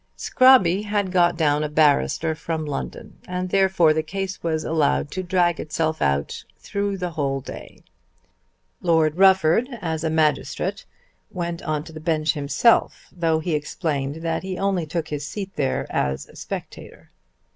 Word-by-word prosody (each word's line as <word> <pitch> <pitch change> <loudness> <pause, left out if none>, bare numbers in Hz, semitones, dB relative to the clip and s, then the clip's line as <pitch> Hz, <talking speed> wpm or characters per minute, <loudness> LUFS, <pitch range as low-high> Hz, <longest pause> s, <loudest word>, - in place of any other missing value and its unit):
Scrobby 230 -8 +5
had 205 -2 -1
got 175 -2 +3
down 150 -2 +2
a 150 - -2
barrister 155 +1 +2
from 160 0 -4
London, 135 - -6
and 180 0 -3
therefore 190 -5 +4
the 155 - 0
case 190 +4 -5
was 160 -2 -1
allowed 155 -2 +1
to 185 - -3
drag 175 -2 +1
itself 155 +1 -2
out 70 +1 -1
through 200 -1 -3
the 180 -2 -3
whole 140 -3 -1
day. - - -11 1.0
Lord 160 -2 +2
Rufford, 190 - +4
as 160 -4 -3
a 160 - 0
magistrate, 155 -1 0 0.4
went 170 -1 -4
on 155 -2 -2
to 160 - -12
the 155 - -8
bench 155 -1 0
himself, 150 +10 +1
though 165 -2 +1
he 170 +1 -2
explained 150 -1 -3
that 165 -1 -1
he 185 -1 -5
only 190 -4 0
took 165 0 -3
his 150 -1 -4
seat 195 +1 -6
there 135 -2 -1
as 65 0 -1
a - - -18
spectator. - - -8
165 Hz, 155 wpm, -23 LUFS, 155-185 Hz, 1.0 s, Scrobby